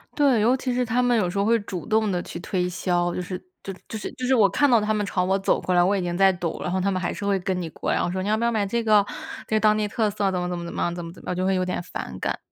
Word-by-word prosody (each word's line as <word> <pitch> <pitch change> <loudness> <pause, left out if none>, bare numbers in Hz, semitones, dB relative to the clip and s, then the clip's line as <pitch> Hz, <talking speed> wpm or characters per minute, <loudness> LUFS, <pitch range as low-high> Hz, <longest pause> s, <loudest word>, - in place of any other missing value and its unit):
对， 275 -7 +3
尤 240 +4 +4
其 255 -1 -2
是 250 +1 +1
他 245 +2 +1
们 245 -1 +3
有 185 -5 +1
时 175 - -5
候 200 - +2
会 230 +1 +3
主 190 -4 -6
动 220 -1 +1
地 180 -1 -1
去 - - -7
推 180 0 -1
销， 175 -1 0
就 - - -3
是 180 +1 -5 0.3
就 195 - -5
是 180 - -16
就 220 - -5
是 - - -5
就 255 - -5
是 260 - +3
我 215 -6 +5
看 285 +10 +3
到 235 -3 +5
他 215 +1 0
们 210 -1 0
朝 185 -2 0
我 190 +1 +2
走 195 - +1
过 180 - 0
来， 175 - +5
我 195 +3 +2
已 195 - 0
经 175 -1 -2
在 195 0 +6
抖， 175 -2 -4
然 180 - -2
后 185 +1 0
他 200 - +1
们 185 -2 0
还 175 - -1
是 - - -7
会 200 -1 +2
跟 185 0 -2
你 165 - -4
过。 - - -3
然 - - +1
后 - - 0
说： 185 +1 -2
“你 - - -3
要 215 - +3
不 230 - -2
要 235 - +2
买 215 -3 0
这 235 +4 -1
个， 210 -2 +4 0.4
这 220 - 0
个 - - +4
当 215 0 +4
地 210 -1 0
特 215 +1 0
色 200 -1 0
怎 180 - -1
么 180 0 -2
怎 180 - -3
么 170 - -5
怎 170 - -7
么 - - -3
样， 175 - 0
怎 175 -1 -6
么 165 - -8
怎 - - -15
么 - - -7
样。 180 - -1
“就 185 +1 -1
会 190 - +2
有 185 - +1
点 180 -1 -2
反 180 - -7
感。 - - -2
195 Hz, 400 characters per minute, -24 LUFS, 180-220 Hz, 0.4 s, 在